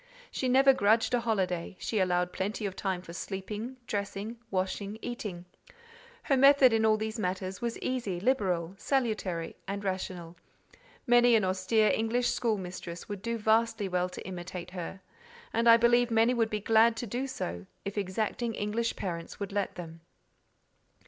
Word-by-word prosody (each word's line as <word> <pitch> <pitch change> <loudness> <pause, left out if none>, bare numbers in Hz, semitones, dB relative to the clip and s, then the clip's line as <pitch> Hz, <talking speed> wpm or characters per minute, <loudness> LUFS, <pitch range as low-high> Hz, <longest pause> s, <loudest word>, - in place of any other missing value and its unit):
She 260 - -1
never 270 +2 +6
grudged 225 +1 +3
a 245 - +4
holiday; 190 -7 -1
she 215 - -2
allowed 180 -1 +1
plenty 205 +3 -2
of 190 -2 -3
time 190 -3 -2
for 170 - -10
sleeping, 210 +7 -5
dressing, 205 +2 -4
washing, 195 +2 -2
eating; 210 -7 -5 0.8
her 275 - +2
method 275 -2 +7
in 220 0 +3
all 215 0 +4
these 220 +1 -4
matters 185 -1 -3
was 235 -1 -2
easy, 235 -9 -2
liberal, 185 -7 0
salutary, 215 -11 -1
and 200 +1 -4
rational: 180 -3 -4 0.7
many 240 -1 +6
an 215 - +3
austere 190 +4 +2
English 235 +2 +1
school 225 -3 0
mistress 180 -2 -7
would 205 -2 -6
do 230 +2 -2
vastly 220 -1 +2
well 180 0 0
to - - -9
imitate 180 -1 -6
her—and 235 - -4
I 230 - +9
believe 240 +1 +4
many 225 +2 +4
would 230 -2 +1
be 210 -1 -2
glad 225 +2 +4
to 240 - -3
do 245 +5 -3
so, 85 - -5 0.2
if 200 - -4
exacting 215 +3 -2
English 220 +3 -1
parents 170 -3 -5
would 200 -1 -4
let 200 -1 -2
them. 165 -2 -9
210 Hz, 160 wpm, -30 LUFS, 185-235 Hz, 0.8 s, I